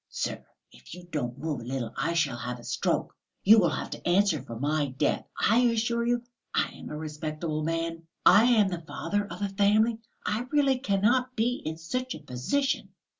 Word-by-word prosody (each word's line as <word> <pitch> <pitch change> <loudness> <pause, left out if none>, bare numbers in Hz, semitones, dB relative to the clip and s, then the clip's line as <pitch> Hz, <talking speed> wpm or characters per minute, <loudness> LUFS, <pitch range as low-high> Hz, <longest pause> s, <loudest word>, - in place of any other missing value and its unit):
"Sir, - - -3 0.3
if 60 - -12
you 180 -1 -11
don't 125 -5 -2
move 145 -3 -3
a - - -8
little 120 -2 -4
I 150 +5 0
shall 150 -7 +1
have 120 +1 -4
a - - -13
stroke; - - -1 0.3
you 220 +3 +8
will 175 -5 +4
have - - -4
to - - -6
answer 180 -5 +3
for 115 -3 -8
my 145 +1 +1
death, 130 0 -1
I 225 +3 +4
assure 235 -1 +2
you.... 240 0 +1 0.3
I - - +2
am - - -10
a 150 - -5
respectable 155 0 -4
man, 165 0 -2 0.2
I 220 - +8
am 220 -5 +4
the 175 -2 -4
father 205 +5 -2
of 180 +3 -6
a 200 - 0
family. 215 +3 +3 0.3
I 230 +4 -1
really 275 -3 +3
cannot 250 +4 +1
be 240 +3 0
in 160 +1 -3
such 255 +11 -3
a - - -8
position!..." 150 - -1
175 Hz, 195 wpm, -28 LUFS, 150-225 Hz, 0.3 s, you